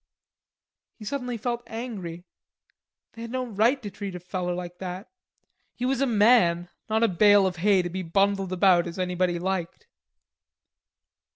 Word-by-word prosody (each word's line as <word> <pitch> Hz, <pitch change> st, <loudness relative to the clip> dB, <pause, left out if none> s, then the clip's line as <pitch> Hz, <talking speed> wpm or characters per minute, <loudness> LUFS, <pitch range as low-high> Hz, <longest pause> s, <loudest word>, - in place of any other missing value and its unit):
He 215 Hz, -, -11 dB
suddenly 250 Hz, 0 st, -3 dB
felt 240 Hz, +1 st, -3 dB
angry. 195 Hz, -8 st, -6 dB, 0.9 s
They 230 Hz, -, -11 dB
had 230 Hz, -, -6 dB
no 255 Hz, +1 st, -2 dB
right 235 Hz, +4 st, +2 dB
to 205 Hz, -, -6 dB
treat 195 Hz, 0 st, -6 dB
a -, -, -5 dB
feller 180 Hz, 0 st, -3 dB
like 175 Hz, 0 st, -7 dB
that. 185 Hz, +2 st, -6 dB, 0.7 s
He 245 Hz, -, -3 dB
was 265 Hz, 0 st, 0 dB
a 275 Hz, -, +3 dB
man, 205 Hz, -7 st, +4 dB, 0.2 s
not 220 Hz, +1 st, +2 dB
a -, -, +5 dB
bale 205 Hz, +1 st, +5 dB
of 180 Hz, -2 st, -2 dB
hay 190 Hz, +1 st, +3 dB
to 175 Hz, -, -3 dB
be 190 Hz, +2 st, -3 dB
bundled 195 Hz, +2 st, +1 dB
about 180 Hz, -2 st, +4 dB
as 170 Hz, -, -7 dB
anybody 180 Hz, -1 st, 0 dB
liked. 180 Hz, -1 st, -3 dB
195 Hz, 160 wpm, -26 LUFS, 180-225 Hz, 0.9 s, a